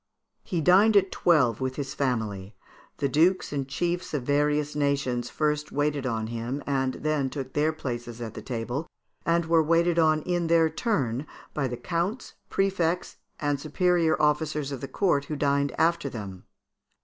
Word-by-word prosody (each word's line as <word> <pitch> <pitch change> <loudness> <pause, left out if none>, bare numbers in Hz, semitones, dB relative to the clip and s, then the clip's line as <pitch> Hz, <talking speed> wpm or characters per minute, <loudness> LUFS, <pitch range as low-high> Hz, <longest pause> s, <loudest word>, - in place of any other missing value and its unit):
He 175 -3 -2
dined 200 +6 +6
at 195 -1 +3
twelve 135 -9 +3
with 130 0 -2
his 140 -2 -4
family; 110 -7 -2 0.4
the 140 - 0
dukes 165 +6 +2
and 135 -2 -2
chiefs 175 +4 -2
of 135 - -2
various 145 +2 +1
nations 140 -4 0
first 150 -1 -1
waited 145 -2 0
on 115 -2 -1
him, 120 +5 -4
and 135 -2 0
then 150 -3 0
took 130 -1 -6
their 150 +2 +2
places 120 -6 -5
at 115 -2 -5
the - - -7
table, 125 +5 -4 0.4
and 170 0 +2
were 165 0 +4
waited 170 +2 +2
on 155 -1 +3
in 175 -2 0
their 165 -1 +4
turn 145 - -1 0.3
by 140 -3 0
the 120 -1 -5
counts, 170 - -3 0.2
prefects, 180 -3 0 0.2
and 145 -2 0
superior 165 +1 +1
officers 150 -1 +1
of 135 - -5
the 135 - -4
court, 145 -1 +1
who 150 - -4
dined 140 0 +1
after 165 -2 +2
them. 100 -6 -8
145 Hz, 165 wpm, -27 LUFS, 130-165 Hz, 0.4 s, dined